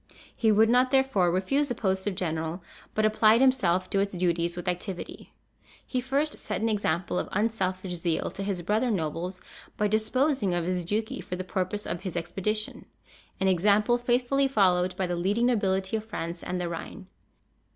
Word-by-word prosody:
He 220 -2 +3
would 220 +2 +5
not, 250 +2 +4
therefore, 265 -10 +3
refuse 195 +12 +1
the 245 - -2
post 190 -2 0
of 200 - -1
general, 165 0 -3 0.3
but 215 - +2
applied 215 +1 +5
himself 195 -9 +3
to 195 - +2
its 200 -2 -1
duties 170 -1 0
with 175 - -6
activity. 180 +1 -4 0.5
He 255 - -2
first 280 +4 -1
set - - -3
an 225 - 0
example 180 -4 0
of - - -4
unselfish 190 -3 -1
zeal 170 -1 -1
to - - -7
his 195 -3 -2
brother 215 +7 +1
nobles, 180 -1 -2 0.4
by 210 - +2
disposing 220 - +1
of 175 -1 -1
his 180 -1 -1
duchy 215 +5 -2
for 180 - -5
the 185 - -4
purpose 185 +2 -3
of 170 +1 -4
his 185 -3 -5
expedition, 205 +5 -2 0.5
an 190 - +1
example 205 +6 +3
faithfully 245 +3 +2
followed 185 -7 +2
by 190 - -1
the 175 0 -2
leading 200 +7 +1
nobility 195 -4 +1
of 215 - -6
France 170 -6 -5
and 180 - -3
the 175 - -2
Rhine. 170 +3 -7
195 Hz, 180 wpm, -27 LUFS, 180-225 Hz, 0.5 s, would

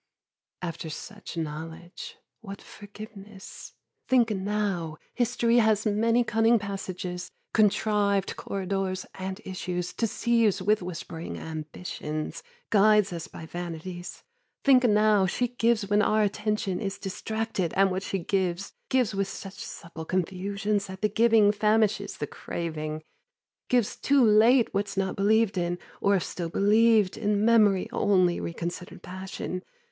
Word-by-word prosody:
After 165 -2 -4
such 205 +4 -8
knowledge, 160 +3 -6 0.2
what 200 -2 -9
forgiveness? 205 -1 -11 0.3
Think 245 -3 +4
now 195 -5 -2 0.2
History 240 -1 +2
has 220 -2 +3
many 225 +3 +3
cunning 225 +1 +3
passages, 185 -3 -5 0.2
contrived 205 -2 +2
corridors 195 -1 -3
And 190 +1 -5
issues, 180 -2 -4
deceives 230 -2 +1
with 210 +3 +2
whispering 170 -2 -6
ambitions, 155 -1 -5 0.3
Guides 210 -2 +5
us 165 -1 -5
by 160 - -10
vanities. 175 +1 -7 0.4
Think 260 -2 +6
now 210 -3 +4
She 245 +5 0
gives 230 -3 +1
when 205 +1 +3
our 215 +1 +3
attention 210 -2 -1
is 195 -2 -3
distracted 215 -2 -3
And 195 0 +4
what 185 +1 -1
she 195 - -2
gives, 185 +1 -1 0.2
gives 255 -5 +2
with 195 0 0
such 195 0 -8
supple 165 -1 -8
confusions 200 +3 -1
That 190 +2 -9
the 210 - +3
giving 220 -1 +5
famishes 215 0 +1
the - - -2
craving. 155 -2 -5 0.7
Gives 245 -4 +2
too 280 -2 +3
late 225 +3 +5
What's 200 0 -2
not 190 -1 0
believed 205 -1 +2
in, 175 0 -1 0.2
or 200 0 +4
if 185 - +1
still 170 -2 -4
believed, 210 +1 +4
In 210 -1 +1
memory 210 -5 +4
only, 185 -4 +2
reconsidered 170 +1 -6
passion. 185 0 -5
200 Hz, 130 wpm, -27 LUFS, 180-215 Hz, 0.7 s, Think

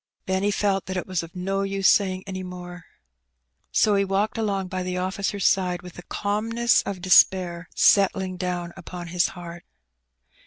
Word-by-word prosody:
Benny 190 +2 0
felt 195 -2 0
that 185 0 -3
it 180 - -3
was 185 -3 -2
of 165 +1 -11
no 195 +2 -2
use 195 0 +1
saying 185 -2 +3
any 190 -1 -5
more, 180 -1 -9 0.9
so 210 - +3
he 200 0 +3
walked 195 +2 0
along 200 -4 -1
by 185 0 -4
the 180 0 -3
officer's 190 +1 -2
side 180 -3 +2
with 180 -1 -10
the - - -10
calmness 225 +5 +1
of 185 -3 -5
despair 180 -2 +4
settling 190 -2 +3
down 180 -1 -3
upon 175 -2 -8
his 180 +1 +2
heart. 175 0 -9
185 Hz, 165 wpm, -24 LUFS, 180-195 Hz, 0.9 s, despair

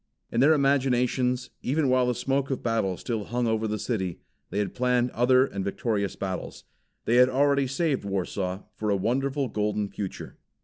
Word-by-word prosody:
In 115 - 0
their 145 +5 +6
imaginations, 130 -2 +1
even 145 +2 +1
while 130 -1 +3
the 125 - +1
smoke 135 +2 -1
of 135 - -3
battle 110 -6 0
still 110 -4 -3
hung 120 +1 -1
over 110 -1 0
the 105 0 -2
city, 95 -6 -2 0.3
they 100 - -4
had 105 -1 -1
planned 125 0 +1
other 130 +2 +4
and 100 -7 -4
victorious 100 0 -1
battles. 95 -1 -5 0.4
They 120 - +3
had 125 +1 +7
already 140 +1 +2
saved 140 +1 0
Warsaw 95 -1 -3
for 105 - -3
a 100 - +3
wonderful 135 +6 0
golden 105 -2 -1
future. 100 -2 -7
125 Hz, 175 wpm, -26 LUFS, 105-130 Hz, 0.4 s, had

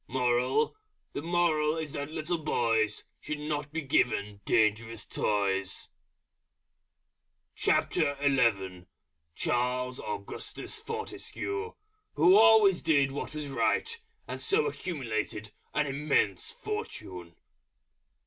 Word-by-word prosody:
MORAL 125 - +1 0.4
The - - -3
moral 165 -2 +2
is 155 -3 -4
that 145 +1 -4
little 160 +2 -2
Boys 115 -7 +1 0.2
Should 150 - -4
not 150 -1 -3
be 160 +1 -2
given 105 -6 +1
dangerous 110 0 +1
Toys. 95 -2 -1 1.7
CHARLES 115 -11 +1 1.1
AUGUSTUS 100 -1 -5
FORTESCUE, 445 -1 -4 0.4
_Who 175 +5 +7
always 215 -4 +7
Did 140 -4 +3
what 145 +2 -5
was 150 -2 -4
Right, 455 - 0 0.3
and - - -5
so 445 +3 +4
accumulated 115 - -3 0.2
an 150 - +2
Immense 150 - 0
Fortune. 420 - -6
145 Hz, 90 wpm, -29 LUFS, 110-175 Hz, 1.7 s, Who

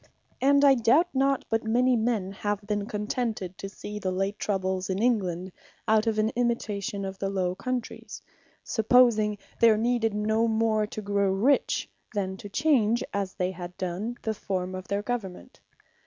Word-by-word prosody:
And 280 +1 +5
I 275 - +8
doubt 270 +8 +3
not, 275 0 +1
but 225 0 +1
many 245 +3 +3
men, 220 -4 0
have 205 +1 -3
been 205 -1 -2
contented 210 -3 -3
to 195 - -5
see 210 +1 -7
the 190 - -2
late 195 +3 -2
troubles 190 -2 -1
in 190 - 0
England, 190 -6 0 0.4
out 220 +1 +3
of 220 -1 +1
an 215 +1 +2
imitation 210 -5 -1
of 190 0 -6
the 195 - -1
Low 185 -2 0
Countries; 250 +4 -5 0.4
supposing 220 -2 +3 0.2
there 225 -2 +6
needed 225 -1 +1
no 220 +2 +1
more 220 -1 +1
to 215 0 -7
grow 200 -1 +1
rich, 235 +9 +2 0.3
than 190 -2 -1
to 205 - -9
change, 240 -3 +2
as 200 -2 -2
they 180 0 -1
had 180 -1 -8
done, 190 +7 -3
the 220 - -1
forme 185 -3 -3
of 185 0 -6
their 200 +1 -1
Government. 215 -6 -5
210 Hz, 170 wpm, -27 LUFS, 195-235 Hz, 0.4 s, I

